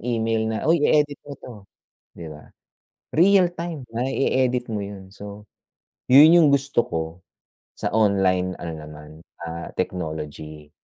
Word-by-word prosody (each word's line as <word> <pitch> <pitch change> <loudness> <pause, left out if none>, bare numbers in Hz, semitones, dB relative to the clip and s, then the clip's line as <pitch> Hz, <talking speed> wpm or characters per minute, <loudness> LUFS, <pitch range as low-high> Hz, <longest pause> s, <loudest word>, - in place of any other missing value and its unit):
email 115 -2 -1
na, 110 0 -3
"Uy, 165 0 +3
edit 145 -1 +1
mo 140 -1 -10
'to," 125 - -11 0.6
di 85 - -10
ba? 75 0 -13 0.6
Real 185 +2 +4
time 170 -4 -6
na 120 +3 -2
i-edit 130 -2 0
mo 110 - -2
yun. 100 -2 -8
So, 100 +1 -10 0.7
yun 145 +5 +8
yung 170 -2 +6
gusto 140 -3 +1
ko 80 -1 -2 0.7
sa - - -4
online, 95 -4 +1
ano 85 -1 -5
naman, 75 +1 -12 0.2
ah, 85 0 -7
technology. 75 -4 -6
110 Hz, 140 wpm, -23 LUFS, 85-140 Hz, 0.7 s, yun